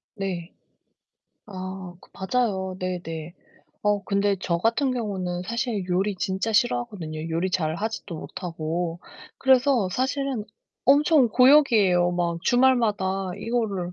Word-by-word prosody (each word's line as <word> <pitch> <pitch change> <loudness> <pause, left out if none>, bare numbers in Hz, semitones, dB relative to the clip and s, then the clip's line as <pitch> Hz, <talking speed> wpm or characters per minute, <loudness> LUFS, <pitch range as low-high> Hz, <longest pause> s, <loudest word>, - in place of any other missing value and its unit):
네. 185 -3 -4 0.9
아 185 -2 -7
그 - - -20
맞아요. 190 -3 -1
네네. 170 -2 -5 0.5
어 205 -1 +1
근데 200 0 +1
저 170 -2 0
같은 235 +6 +1
경우는 190 -7 -3
사실 235 -3 -2
요리 195 +3 +1
진짜 190 +5 -2
싫어하거든요 205 -9 -1
요리 170 +3 -1
잘 160 -4 0
하지도 205 -3 -4
못하고. 170 0 -4 0.4
그래서 260 -5 +3
사실은 265 -1 -1 0.4
엄청 285 -1 +5
고역이에요. 220 -9 +5
막 170 -1 -1
주말마다 210 -7 +2
'이거를 205 -6 -2
195 Hz, 255 characters per minute, -25 LUFS, 180-240 Hz, 0.9 s, 엄청